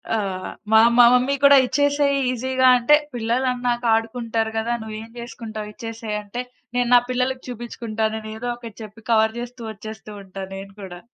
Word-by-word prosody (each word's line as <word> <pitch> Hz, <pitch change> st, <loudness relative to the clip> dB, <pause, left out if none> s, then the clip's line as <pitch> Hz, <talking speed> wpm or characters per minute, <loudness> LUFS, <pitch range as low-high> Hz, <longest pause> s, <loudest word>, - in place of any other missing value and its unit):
ఆహ్, 190 Hz, -3 st, -3 dB, 0.2 s
మా 220 Hz, -, +7 dB, 0.2 s
మ 245 Hz, -, +7 dB
మమ్మీ 255 Hz, +3 st, +3 dB
కూడా 280 Hz, 0 st, +8 dB
"ఇచ్చేసేయి" 285 Hz, +2 st, +2 dB
ఈజీగా 260 Hz, +1 st, +1 dB
అంటే 245 Hz, +5 st, +5 dB, 0.2 s
"పిల్లలన్నాక 245 Hz, +1 st, -1 dB
ఆడుకుంటారు 225 Hz, 0 st, -1 dB
కదా! 230 Hz, +2 st, 0 dB
నువ్వేం 220 Hz, 0 st, -7 dB
చేసుకుంటావు 220 Hz, -3 st, -7 dB
ఇచ్చేసేయి" 225 Hz, -2 st, -5 dB
అంటే 225 Hz, +5 st, -5 dB, 0.4 s
"నేను 245 Hz, -1 st, +2 dB
నా -, -, +9 dB
పిల్లలకి 255 Hz, +1 st, -1 dB
చూపించుకుంటాను" 225 Hz, -2 st, -3 dB
అని 215 Hz, 0 st, -8 dB
ఏదో 245 Hz, +2 st, -4 dB
ఒకటి 230 Hz, -3 st, -10 dB
చెప్పి, 215 Hz, +2 st, -12 dB
కవర్ 220 Hz, 0 st, +3 dB
చేస్తూ, 240 Hz, 0 st, -8 dB
వచ్చేస్తూ 215 Hz, +1 st, -10 dB
ఉంటా 190 Hz, 0 st, -8 dB
నేను 195 Hz, 0 st, -9 dB
కూడా. 175 Hz, -2 st, -8 dB
230 Hz, 155 wpm, -22 LUFS, 220-250 Hz, 0.4 s, నా